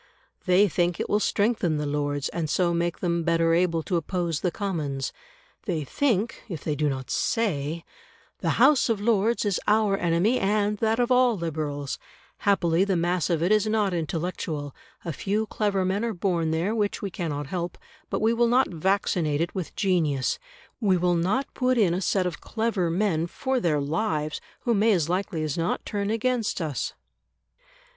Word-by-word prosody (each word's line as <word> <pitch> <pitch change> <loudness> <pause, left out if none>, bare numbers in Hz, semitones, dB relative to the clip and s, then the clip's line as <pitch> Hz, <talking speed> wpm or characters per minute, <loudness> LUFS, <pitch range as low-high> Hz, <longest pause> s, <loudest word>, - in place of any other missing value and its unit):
They 185 +3 +5
think 175 -1 0
it - - -1
will 210 - +3
strengthen 205 -7 +1
the 150 - -2
Lords, 145 -1 -1
and 165 -3 -3
so 175 +1 +2
make 170 0 -1
them 170 -1 0
better 165 0 +2
able 165 -1 +2
to 180 - 0
oppose 170 -1 -1
the 180 - 0
Commons; 155 -9 -3 0.5
they 165 -6 -1
think, 230 - 0
if 165 -6 -6
they 155 - -1
do 150 0 0
not 130 -1 -4
say: 165 -7 -1 0.5
"The - - 0
House 295 -4 +5
of 225 -3 +1
Lords 225 +1 +2
is 200 -3 0
our 210 -2 +3
enemy 180 +7 +2
and 205 +1 +1
that 225 +1 +1
of 245 +1 +1
all 250 -3 +4
Liberals; 150 -4 -3 0.4
happily 180 -3 +2
the 195 -1 +1
mass 175 -1 0
of 165 -2 +1
it 180 - +2
is 215 0 +3
not 215 -3 +1
intellectual; 160 -3 -3 0.3
a 165 - -2
few 205 +8 -1
clever 205 -3 0
men 195 +4 0
are 230 -1 -1
born 170 -3 0
there 165 +6 0
which 210 -3 -1
we 200 - -3
cannot 150 -5 -3
help, 175 +4 -4 0.3
but - - -2
we 225 +1 +3
will 235 0 +3
not 250 +3 +3
'vaccinate' 170 -3 +1
it 170 - -1
with 185 -4 -5
genius; 160 -9 +1 0.4
we 195 -5 +3
will 180 0 +2
not 195 +11 +1
put 255 -1 +1
in 195 -7 +3
a 180 - -1
set 190 -1 +1
of 180 -3 -4
clever 220 -6 -1
men 170 -2 +1
for 260 +8 -1
their 160 -8 +1
lives 155 0 -1 0.2
who 240 - +1
may 215 +1 +4
as 170 -4 +1
likely 180 -3 -1
as 155 +1 -2
not 165 - -1
turn 205 -1 -2
against 230 0 0
us". 155 -6 -2
180 Hz, 180 wpm, -26 LUFS, 165-210 Hz, 0.5 s, They